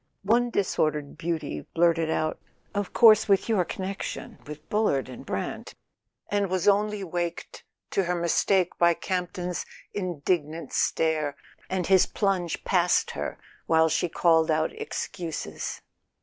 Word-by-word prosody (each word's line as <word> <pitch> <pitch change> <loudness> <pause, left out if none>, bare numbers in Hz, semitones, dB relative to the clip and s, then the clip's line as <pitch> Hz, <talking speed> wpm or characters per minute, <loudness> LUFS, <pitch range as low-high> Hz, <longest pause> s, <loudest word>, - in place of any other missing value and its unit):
One 235 +4 +3
disordered 155 -8 0
beauty 160 - -3
blurted 165 -1 +3
out: 155 0 -1 0.3
"Of 205 -2 -2
course, 220 -2 +6
with 195 -1 +3
your 215 -5 +2
connection 190 +3 -5
with 150 0 -9
Bullard 210 -11 +1
and 130 -2 -9
Brant"—and 205 -2 -5
was 185 0 -1
only 205 0 +2
waked 175 -1 -4 0.3
to 195 - +1
her 180 +1 0
mistake 175 +2 +2
by 170 -1 +5
Campton's 180 -1 -3 0.3
indignant 170 -3 -2
stare, 155 -3 +1 0.3
and 185 -2 -1
his 190 0 +5
plunge 190 -5 -1
past 180 -2 +2
her - - -4 0.3
while 160 0 +4
she 170 +2 0
called 160 -1 +3
out 155 0 +1
excuses. 170 -4 -5
175 Hz, 125 wpm, -26 LUFS, 160-195 Hz, 0.3 s, course